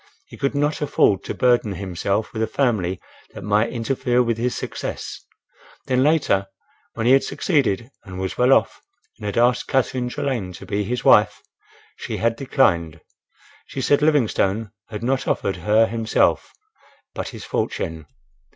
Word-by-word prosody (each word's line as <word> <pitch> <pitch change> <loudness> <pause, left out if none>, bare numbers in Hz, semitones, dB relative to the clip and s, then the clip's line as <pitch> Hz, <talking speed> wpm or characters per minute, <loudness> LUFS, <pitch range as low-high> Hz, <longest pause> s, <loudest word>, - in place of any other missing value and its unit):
He - - -13
could 140 +1 -2
not 145 +2 0
afford 105 -9 +2
to - - -4
burden 120 -5 +2
himself 100 +2 -2
with 110 - -3
a 110 - +1
family 105 -8 0 0.4
that - - -8
might 105 +2 +2
interfere 125 +1 0
with 115 -1 0
his 125 +1 -1
success. - - -6 0.6
Then 130 0 +1
later, 135 -10 +2 0.5
when 115 - -2
he 125 - +5
had 135 0 +5
succeeded 135 - 0
and 95 -3 -8
was 95 0 -3
well 125 +2 +3
off - - +2 0.4
and 105 - -5
had 100 - -3
asked 120 +1 +2
Catherine 130 -2 0
Trelane 120 -9 -3
to - - -10
be 105 0 -1
his 120 +5 -3
wife, 105 0 +5 0.6
she - - -5
had 115 0 +1
declined. 85 - +1 0.7
She - - -6
said 145 +2 +2
Livingstone 115 -8 +1 0.2
had 110 0 -6
not 130 +2 0
offered 95 -2 -1
her 105 +6 +3
himself, 115 0 +1 0.6
but - - -4
his - - -9
fortune. 80 -2 -3
115 Hz, 160 wpm, -22 LUFS, 100-130 Hz, 0.7 s, he